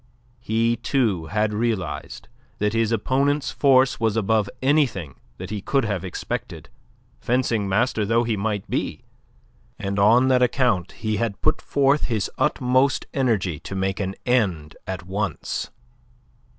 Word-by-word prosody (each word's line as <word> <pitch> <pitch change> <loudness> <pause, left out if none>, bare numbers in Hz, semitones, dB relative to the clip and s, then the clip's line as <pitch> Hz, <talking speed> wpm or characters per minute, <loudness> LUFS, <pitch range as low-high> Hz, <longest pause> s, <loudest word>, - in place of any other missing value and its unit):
He, 115 +1 +1
too, 110 - 0
had 105 +4 0
realized 105 -6 -3 0.3
that 105 -1 0
his 115 -1 +1
opponent's 140 +6 +1
force 130 -4 +3
was 110 -1 +1
above 110 -1 +1
anything 130 - +1 0.2
that 95 +2 -7
he 105 -2 -3
could 135 +4 +1
have 100 -4 -2
expected, 95 - -5 0.5
fencing 115 -5 0
master 110 +2 +1
though 115 +3 +2
he 115 -2 0
might 105 -1 -2
be, - - -3 0.7
and 100 0 -3
on 115 +6 +5
that 130 -1 +4
account 125 -8 +1
he 110 -1 -2
had 115 -4 -2
put - - +1
forth 140 +1 +2
his 110 -5 -1
utmost 130 +2 +2
energy 105 - 0
to 95 - -7
make 95 +1 -1
an 95 -1 -2
end 95 -12 0
at 95 -1 -5
once. 95 -3 -3
110 Hz, 140 wpm, -23 LUFS, 95-125 Hz, 0.7 s, on